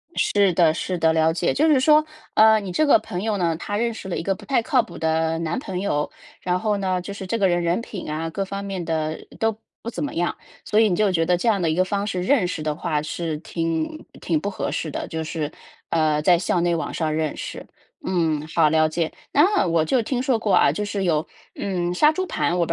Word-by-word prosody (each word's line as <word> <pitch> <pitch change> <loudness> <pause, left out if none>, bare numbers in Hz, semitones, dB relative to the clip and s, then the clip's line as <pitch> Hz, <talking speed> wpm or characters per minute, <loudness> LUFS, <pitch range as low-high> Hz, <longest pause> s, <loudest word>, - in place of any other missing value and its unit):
是 200 -2 +3
的 165 -3 +4
是 180 +2 -3
的， 160 -1 +3
了 160 0 +3
解。 170 +1 0
就 310 +3 +2
是 285 -4 +5
说， 305 +3 +5 0.3
呃 220 0 +6
你 195 -3 -6
这 310 - +2
个 280 - +6
朋 190 -3 -5
友 215 -2 0
呢 170 -3 +1
她 205 +3 -3
认 235 +1 0
识 190 - -8
了 - - -2
一 - - -3
个 195 +1 0
不 - - -14
太 270 -4 +2
靠 250 0 +2
谱 - - -11
的 160 0 0
男 165 +1 -2
朋 185 -7 -5
友， 150 -7 -1 0.3
然 180 0 0
后 210 -1 0
呢 185 -2 -1
就 200 +2 -7
是 195 - -7
这 230 +5 -1
个 195 - +4
人 175 -1 +1
人 170 +5 +1
品 190 -8 -7
啊 160 +2 -3
各 195 +4 -2
方 200 +1 -5
面 190 -3 -4
的 160 -1 -3
都 225 -1 0 0.2
不 235 - -5
怎 240 - -4
么 285 - -3
样， 175 +1 -1 0.3
所 215 - +2
以 220 - +5
你 180 - +1
就 210 -1 +2
觉 165 -2 +1
得 175 +1 +2
这 235 - -2
样 205 -4 +3
的 165 - +1
一 155 - 0
个 185 +2 +2
方 200 +1 -1
式 185 -3 -2
认 225 -4 +3
识 165 - -4
的 150 -1 -2
话， 150 0 -1
是 155 0 -3
挺 165 - -3 0.2
挺 165 -3 0
不 200 - -3
合 190 - -3
适 155 - -3
的， - - -4
就 160 0 -4
是， 155 -1 -3 0.4
呃 155 -2 +2
在 175 +2 +5
校 175 0 0
内 170 0 +2
网 165 - -3
上 155 -2 -1
认 155 -1 -1
识。 - - -6 0.4
嗯， 160 -4 0
好 160 -1 +3
了 155 0 +3
解。 160 0 -2 0.2
那 350 - +3
我 165 -2 +2
就 245 +9 +2
听 250 +2 -2
说 260 -5 +1
过 205 -4 +2
啊， - - +5
就 210 - -3
是 205 -1 -2
有 160 -4 +1 0.3
嗯 180 -3 -2
杀 300 +11 +5
猪 375 +4 -2
盘， 265 - -1
我 170 - +2
不 - - -10
180 Hz, 275 characters per minute, -23 LUFS, 160-210 Hz, 0.4 s, 呃